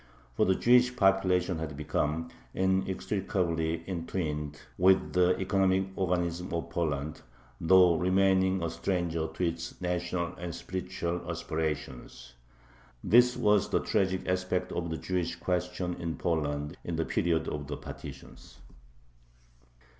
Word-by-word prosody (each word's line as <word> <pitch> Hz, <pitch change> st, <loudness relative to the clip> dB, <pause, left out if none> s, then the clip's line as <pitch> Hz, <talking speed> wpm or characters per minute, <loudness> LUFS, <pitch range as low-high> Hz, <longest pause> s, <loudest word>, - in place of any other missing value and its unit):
For -, -, +3 dB
the 95 Hz, -, +4 dB
Jewish 125 Hz, +3 st, +4 dB
population 95 Hz, -4 st, +2 dB
had 75 Hz, -4 st, -5 dB
become 75 Hz, +2 st, -1 dB, 0.2 s
inextricably 95 Hz, -3 st, 0 dB
entwined 80 Hz, -5 st, -3 dB, 0.2 s
with 95 Hz, +1 st, +3 dB
the 90 Hz, 0 st, +4 dB
economic 95 Hz, 0 st, +2 dB
organism 90 Hz, -1 st, -1 dB
of 85 Hz, 0 st, -4 dB
Poland, 75 Hz, -3 st, -2 dB, 0.4 s
though 90 Hz, 0 st, +6 dB
remaining 95 Hz, 0 st, +3 dB
a 85 Hz, -, -1 dB
stranger 85 Hz, -4 st, -1 dB
to 80 Hz, -, -4 dB
its 85 Hz, +1 st, -5 dB
national 90 Hz, -1 st, -2 dB
and 85 Hz, -1 st, -5 dB
spiritual 90 Hz, -2 st, -4 dB
aspirations. 75 Hz, -7 st, -4 dB, 0.7 s
This 125 Hz, +2 st, +5 dB
was 105 Hz, -4 st, +3 dB
the -, -, +2 dB
tragic 95 Hz, -1 st, 0 dB
aspect 90 Hz, 0 st, -1 dB
of 85 Hz, -1 st, -3 dB
the 80 Hz, -, -3 dB
Jewish 85 Hz, -2 st, -2 dB
question 90 Hz, 0 st, -2 dB
in 85 Hz, -1 st, -2 dB
Poland 75 Hz, -3 st, -1 dB
in 85 Hz, -, -3 dB
the 80 Hz, 0 st, 0 dB
period 80 Hz, -2 st, 0 dB
of 75 Hz, -1 st, -4 dB
the 70 Hz, 0 st, -4 dB
partitions. -, -, -10 dB
90 Hz, 125 wpm, -30 LUFS, 80-95 Hz, 0.7 s, though